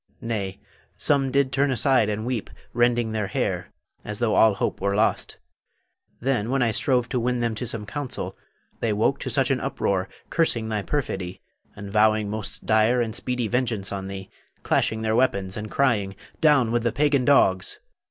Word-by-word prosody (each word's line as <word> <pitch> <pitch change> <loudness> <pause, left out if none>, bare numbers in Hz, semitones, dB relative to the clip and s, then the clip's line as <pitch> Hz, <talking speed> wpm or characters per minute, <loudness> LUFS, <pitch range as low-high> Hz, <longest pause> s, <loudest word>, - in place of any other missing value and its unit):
Nay, 100 -5 -3 0.4
some 135 -2 +2
did 140 -1 +2
turn 140 +2 +2
aside 130 -3 +3
and 105 +1 -3
weep, 120 -4 -3 0.2
rending 120 -1 +2
their 110 -2 -1
hair, - - -2 0.3
as 105 0 -4
though 115 -1 +1
all 110 -2 +5
hope - - -2
were 100 +1 0
lost. 110 +2 0 0.8
Then, 120 -4 0
when 135 0 +2
I 115 - +2
strove 125 +1 +1
to 125 - 0
win 125 +1 0
them 120 -1 0
to 115 +3 -4
some 110 -1 -3
counsel, 135 +5 -5 0.4
they 115 -2 0
woke 110 +6 +1
to - - -4
such 135 -1 +1
an 130 - +1
uproar, 95 -8 -1 0.2
cursing 120 -9 +1
thy 105 -1 -1
perfidy, 95 -9 -3 0.4
and 100 -1 -8
vowing 110 -1 +3
most 110 -1 -5
dire 110 +3 +3
and 115 -3 -1
speedy 125 -2 -1
vengeance 115 -4 -1
on 95 -1 -4
thee, 95 0 -7 0.3
clashing 110 0 +1
their 110 0 +1
weapons 100 -7 +1
and 105 0 -5
crying, 105 -8 +1 0.2
"Down 145 -7 +4
with 120 0 +1
the 120 0 0
pagan 140 +2 +2
dogs!" 95 -9 +3
115 Hz, 180 wpm, -24 LUFS, 105-125 Hz, 0.8 s, all